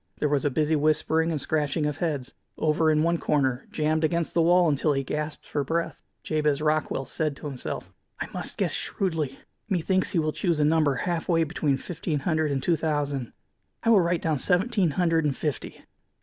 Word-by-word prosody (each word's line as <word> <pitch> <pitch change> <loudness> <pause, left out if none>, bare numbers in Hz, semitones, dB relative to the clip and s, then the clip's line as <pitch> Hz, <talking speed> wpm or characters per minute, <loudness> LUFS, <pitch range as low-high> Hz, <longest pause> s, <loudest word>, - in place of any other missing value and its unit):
There 150 - +1
was 145 -1 +1
a 145 - +2
busy 155 +3 +1
whispering 155 +2 +2
and 155 - -1
scratching 150 +1 0
of 150 -1 -2
heads. 140 -6 -2 0.2
Over 155 +1 +2
in 155 0 +3
one 170 0 +1
corner, 135 -3 0
jammed 155 +1 0
against 170 +1 0
the 170 - +3
wall 175 +1 +5
until 150 0 +2
he 135 0 -1
gasped 150 +3 -4
for 145 - -1
breath, 165 +5 -2 0.2
Jabez 150 -2 +1
Rockwell 150 -3 0
said 155 0 -2
to - - -11
himself: 135 -4 -5 0.3
"I - - -2
must - - -3
guess - - 0
shrewdly. 160 -8 -2 0.3
Methinks 185 0 +1
he - - -2
will 155 -1 +1
choose 170 -5 0
a 150 - +3
number 155 -2 +3
half 170 +5 -2
way 165 -1 +4
between 150 -3 0
fifteen 160 -2 -3
hundred 155 -1 +1
and 135 -2 -1
two 170 - +3
thousand. 145 -5 -2 0.5
I 230 - +4
will 205 -4 +6
write 170 0 0
down 155 -4 +1
seventeen 190 - +2
hundred 165 -3 +2
and 145 -3 0
fifty. 150 -3 -4
155 Hz, 195 wpm, -26 LUFS, 145-165 Hz, 0.5 s, will